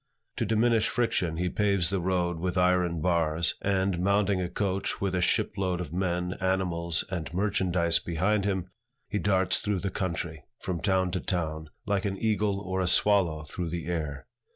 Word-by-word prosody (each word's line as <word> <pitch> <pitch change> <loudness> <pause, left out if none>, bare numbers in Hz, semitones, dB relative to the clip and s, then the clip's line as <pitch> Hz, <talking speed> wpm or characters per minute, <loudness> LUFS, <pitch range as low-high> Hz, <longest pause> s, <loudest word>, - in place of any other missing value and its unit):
To - - 0
diminish 115 0 +3
friction, 90 -9 0
he 90 +1 0
paves 100 -2 +1
the 100 - +1
road 90 -1 0
with 90 +2 -2
iron 90 -2 +2
bars, 85 -1 +2
and, 95 -2 +1
mounting 100 0 +2
a 90 - -2
coach 100 -1 -2
with 100 -2 -1
a 90 - +1
ship - - +1
load 95 -2 0
of 85 -3 -5
men, 90 0 -1
animals, 90 -3 0
and 80 -6 -3
merchandise 90 -4 +1
behind 95 +5 0
him, 95 -3 -1 0.4
he 105 - -2
darts 95 -2 +2
through 100 -3 -1
the 100 - -2
country, 85 -4 -3
from 90 -4 -4
town 95 -2 +1
to 90 - -1
town, 80 -4 -3 0.2
like 100 -1 0
an 95 -1 -1
eagle 105 -2 +1
or 95 -1 -2
a 90 - +1
swallow 90 -6 +3
through 85 +2 -5
the 85 0 -4
air. 80 -5 -3
90 Hz, 175 wpm, -28 LUFS, 85-100 Hz, 0.4 s, diminish